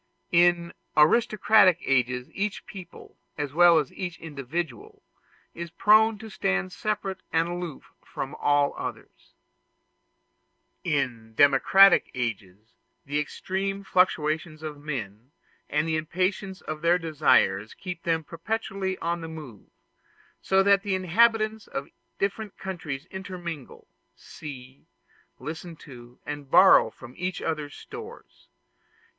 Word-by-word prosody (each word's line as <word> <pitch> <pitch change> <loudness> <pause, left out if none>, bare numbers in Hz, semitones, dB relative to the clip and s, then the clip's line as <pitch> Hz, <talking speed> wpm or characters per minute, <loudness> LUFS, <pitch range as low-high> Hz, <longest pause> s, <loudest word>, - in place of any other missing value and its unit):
In 170 0 +3 0.2
aristocratic 210 +2 +5
ages 125 -1 0
each 205 +1 -3
people, 185 -3 -12 0.2
as 145 -2 -3
well 175 +1 +7
as 150 -4 -1
each 180 -3 -5
individual, 145 -3 -6 0.5
is 170 0 -6
prone 215 +5 +4
to 220 +1 -10
stand 95 - -1
separate 200 -3 -3
and 165 +1 +2
aloof 175 -4 -6
from 135 +2 -6
all 145 -1 +2
others. - - -8 1.5
In 125 - -2
democratic 145 - +6
ages, 110 -3 -5 0.3
the 145 +1 -1
extreme 195 +6 -3
fluctuations 160 -4 +1
of 150 -2 -6
men 120 -6 -6 0.4
and 150 +2 0
the 160 -1 +1
impatience 185 +4 -2
of 155 0 -6
their 170 +2 +4
desires 145 - +2
keep 180 -3 -7
them 165 -1 0
perpetually 190 +2 -3
on 170 0 -2
the 165 - -6
move; 150 -10 -10 0.7
so 190 0 +3
that 200 0 +5
the 200 -2 -1
inhabitants 215 +3 +2
of 135 - -5 0.3
different 200 +1 -3
countries 165 -8 -5
intermingle, 175 -7 -7 0.3
see, 130 -3 -11 0.5
listen 165 +2 -7
to, 120 -5 -13
and 145 -2 -6
borrow 190 -7 +7
from 125 +2 -13
each 180 0 -3
other's 150 -3 -3
stores. 450 +2 -11
165 Hz, 115 wpm, -26 LUFS, 140-190 Hz, 1.5 s, well